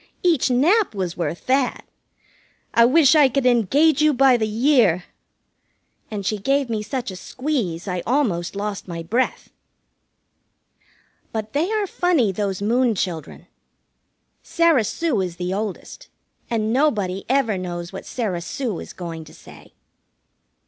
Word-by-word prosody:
Each 335 -8 +3
nap 320 - +3
was 185 -3 -3
worth 170 -1 -4
that. 260 -1 0 0.9
I 235 - +6
wish 295 +3 +5
I 295 -4 +6
could 270 0 -1
engage 270 - +3
you 305 -2 +4
by 265 0 +5
the 220 -2 0
year!" 220 - +3 1.1
And 205 -3 -5
she 215 +1 -1
gave 275 +3 0
me 215 -2 -1
such 245 0 -4
a - - -8
squeeze 210 - -3
I 180 -2 -2
almost 200 -10 0
lost 200 0 -4
my 170 -2 -5
breath. 230 +10 -1 1.8
But 220 -1 -5
they 320 +8 0
are 430 -2 0
funny, 345 - +1
those 195 0 -3
Moon 240 +1 +2
children. 165 -5 -4 1.0
Sarah 330 -9 +2
Sue 300 - -1
is 180 -2 -4
the 180 +1 -3
oldest, 205 -1 -5 0.4
and 220 -1 0
nobody 210 -10 +1
ever 260 -5 +2
knows 175 -1 -5
what 190 - -8
Sarah 200 -8 -3
Sue 230 - -4
is - - -9
going 165 -2 -7
to - - -15
say. - - -16
225 Hz, 140 wpm, -22 LUFS, 190-275 Hz, 1.8 s, I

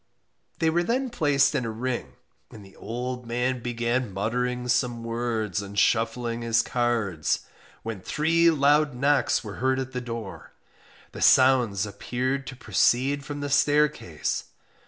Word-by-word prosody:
They 160 0 +2
were 170 +2 +2
then 250 +7 -1
placed 145 - +2
in 140 -4 0
a 115 - -3
ring, 120 +3 -4 0.4
and 105 -3 -12
the 95 - -17
old 125 +1 -5
man 125 +1 -1
began 120 0 -1
muttering 125 +5 -2
some 120 -1 0
words 115 -4 -2
and 100 0 -9
shuffling 115 +2 +1
his 115 0 +2
cards, 115 -10 0 0.4
when 110 -4 -5
three 165 - +2
loud 145 -1 +3
knocks 140 -1 +2
were 105 -3 -8
heard 130 0 +2
at 130 0 -4
the 125 - -4
door. 115 -5 -7 0.6
The - - -9
sounds 125 -7 +4
appeared 125 +6 -3
to 130 - -7
proceed 135 +3 +1
from 145 +1 -6
the 145 - -3
staircase. 145 - +1
125 Hz, 145 wpm, -26 LUFS, 115-140 Hz, 0.6 s, sounds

